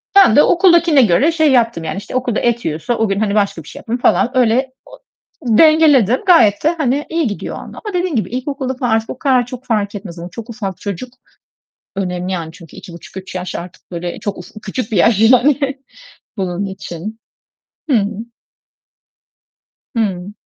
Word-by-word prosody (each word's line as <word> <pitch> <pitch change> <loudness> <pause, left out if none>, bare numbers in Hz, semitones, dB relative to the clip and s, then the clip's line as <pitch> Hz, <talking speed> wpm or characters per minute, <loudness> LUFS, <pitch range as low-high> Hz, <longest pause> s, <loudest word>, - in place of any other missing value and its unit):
Ben 390 - +7
de 295 - +7
okuldakine 340 -5 +4
göre 245 - +3
şey 315 -3 +2
yaptım, 230 -9 +2
yani, 155 +3 -4
işte, 205 - -7
okulda 250 -3 0
et 235 -1 0
yiyorsa 160 +10 -2
o 225 - +1
gün, 195 - 0
hani, 210 -1 0
başka 200 -6 0
bir - - -18
şey - - -10
yaptım 235 +2 -3
falan. 250 +1 +2
Öyle 255 +2 +2
o - - -15 0.6
dengeledim. 295 - +5
Gayet 230 - +5
de 320 +3 +2
hani, 285 0 0
iyi 330 -5 0
gidiyor 205 - -5
orda 420 -3 -8
dediğim 355 -4 -1
gibi 215 - -1
ilkokulda 260 +1 -3
falan 245 -3 -2
artık 225 0 +1
o 255 - -7
kadar 255 -4 +2
çok 255 +1 -9
fark 210 -3 -1
etmez 180 -4 -8
ama 175 +1 -7
çok 230 +3 -9
ufak 200 -6 -5
çocuk, 205 +5 -6 0.8
önemli, 180 -1 -3
yani, 165 -3 -4
çünkü 170 -2 -14
2,5-3 185 +1 -10
yaş 180 0 -5
artık 175 +2 -10
böyle 175 0 -5
çok 205 -2 -4
uf 175 - -11
küçük 215 +2 -4
bir - - +1
yaş 210 +3 +4
yani 255 +5 +5 0.8
bunun 190 +1 -2
için. 195 +2 -7 0.7
Hı 255 - +5
hı. 200 -1 +1 1.9
Hıı. 200 -4 -2
225 Hz, 175 wpm, -17 LUFS, 190-260 Hz, 1.9 s, Ben